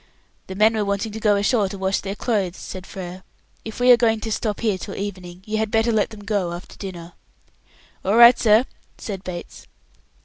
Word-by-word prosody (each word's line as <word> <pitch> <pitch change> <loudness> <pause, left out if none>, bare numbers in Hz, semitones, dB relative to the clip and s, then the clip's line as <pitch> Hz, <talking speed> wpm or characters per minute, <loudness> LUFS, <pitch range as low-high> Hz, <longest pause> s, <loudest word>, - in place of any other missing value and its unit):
"The 190 - -7
men 215 +3 +4
were 215 -1 0
wanting 200 +2 -2
to 220 - -6
go 210 -2 +3
ashore 205 0 +1
to 200 - -7
wash 190 0 0
their 195 +1 -5
clothes," 200 -6 -1
said 185 0 -8
Frere. 185 -1 -8 0.4
"If 220 +1 -8
we 250 0 +6
are 245 - +8
to 225 -1 0
stop 210 -1 -2
here 210 -5 0
till 195 - -7
evening, 185 -2 -7
you 215 0 -2
had 220 -1 -1
better 225 +1 +2
let 215 -2 +1
them 215 -2 -11
go 200 -4 -1
after 175 +2 -9
dinner." 175 -3 -8 0.9
"All 200 +3 +1
right, 235 +1 +8
sir," 220 +2 +4 0.3
said 195 -3 -6
Bates. 175 -1 -8
205 Hz, 200 wpm, -22 LUFS, 190-220 Hz, 0.9 s, are